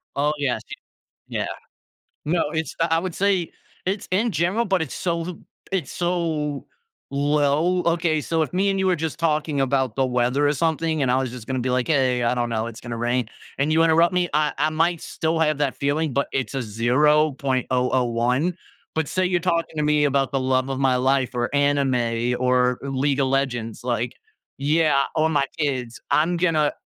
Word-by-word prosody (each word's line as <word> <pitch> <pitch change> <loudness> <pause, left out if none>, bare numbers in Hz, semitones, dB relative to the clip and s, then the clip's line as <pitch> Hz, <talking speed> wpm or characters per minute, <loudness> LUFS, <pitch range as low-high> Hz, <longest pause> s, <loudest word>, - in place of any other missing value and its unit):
Oh, 145 +2 +1
yes, 130 -6 -1
ye - - -6 0.6
Yeah. - - 0 0.8
No, 165 +2 +1
it's 160 -3 -3
I 165 - +3
I - - +2
would 185 -1 -4
say 190 -3 +1 0.3
it's 195 +2 -2
in 215 +4 +2
general 180 +9 +1
but 190 -3 +1
it's 145 - -4
so 170 -2 -1
l 180 -2 -7 0.3
it's 180 -9 -2
so 165 -5 -2 0.5
low. 145 +5 +2
Okay, 170 -2 +1
so 165 +1 0
if 155 - -1
me 195 +2 +2
and 195 0 0
you 190 - +1
were 180 - +3
just 160 +1 -4
talking 150 -3 0
about 130 -3 0
the 135 -1 +2
weather 125 +3 +1
or 145 - +2
something, 160 0 0
and 125 -2 +2
I 130 - +3
was 130 -2 -1
just 125 -3 -9
gonna 130 -1 -1
be 125 +1 -2
like, 125 0 0
"Hey, 130 -5 +2
I 120 - +2
don't 120 -1 -1
know. 110 0 -1
It's 115 -1 -9
gonna 115 -1 -5
rain," 120 0 0 0.3
and 145 +3 +1
you 165 +1 +4
interrupt 165 +2 +4
me, 180 -1 +1
I 150 0 +2
I 155 - +2
might 165 +1 +1
still 160 +1 -2
have 155 -2 +1
that 140 -3 0
feeling, 145 0 -1
but 140 +1 0
it's 135 +1 -2
a 135 - -1
0.001, 130 - +1 0.4
but 160 -2 0
say 185 0 0
you're 180 -1 +1
talking 170 -2 -1
to 150 - +1
me 150 0 +3
about 140 -1 +1
the 135 - 0
love 130 0 +1
of 135 0 -3
my 130 -2 +3
life, 130 0 +1
or 120 +3 -1
anime, 125 -4 +1
or 125 -1 +2
League 140 +1 0
of 135 - +2
Legends, 120 -5 -2
like 120 -1 -1 0.4
Yeah, 150 -1 +2
or 160 +1 +2
my 145 -3 +2
kids, 130 -5 -2
I'm 170 +3 +2
gonna 160 -4 +2
145 Hz, 195 wpm, -23 LUFS, 130-165 Hz, 0.8 s, you